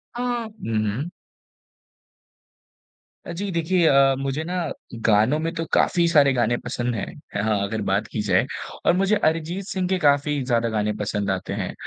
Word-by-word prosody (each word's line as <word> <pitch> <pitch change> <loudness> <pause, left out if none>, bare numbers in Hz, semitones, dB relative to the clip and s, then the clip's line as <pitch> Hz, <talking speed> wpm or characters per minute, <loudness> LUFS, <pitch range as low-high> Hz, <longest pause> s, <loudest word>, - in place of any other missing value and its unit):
अ, 240 - -3
हुँ, 225 - -3
हुँ। 130 +11 -3 2.2
अ, - - -5
जी। 200 +4 -4
देखिए 170 +1 +1
अ, 135 -2 +5
मुझे 135 +3 -2
ना 175 +3 -4 0.5
गानों 110 +6 +4
में 165 +1 -2
तो 165 0 -2
काफ़ी 170 -1 +3
सारे 145 -4 +5
गाने 120 -1 +1
पसंद 120 0 -3
हैं। 105 - -2 0.3
है 105 - 0
हाँ, 110 -1 +1
अगर 110 +2 -3
बात 100 +1 0
की 110 - -3
जाए 105 - +2 0.4
और - - +5
मुझे 195 +2 +3
अरिजीत 165 0 0
सिंह 185 -3 -2
के 190 - +2
काफ़ी 145 -1 +2
ज़्यादा 120 -2 +1
गाने 105 -1 0
पसंद 105 -1 -1
आते 95 -1 -3
हैं। - - -3
140 Hz, 170 wpm, -23 LUFS, 110-170 Hz, 2.2 s, अ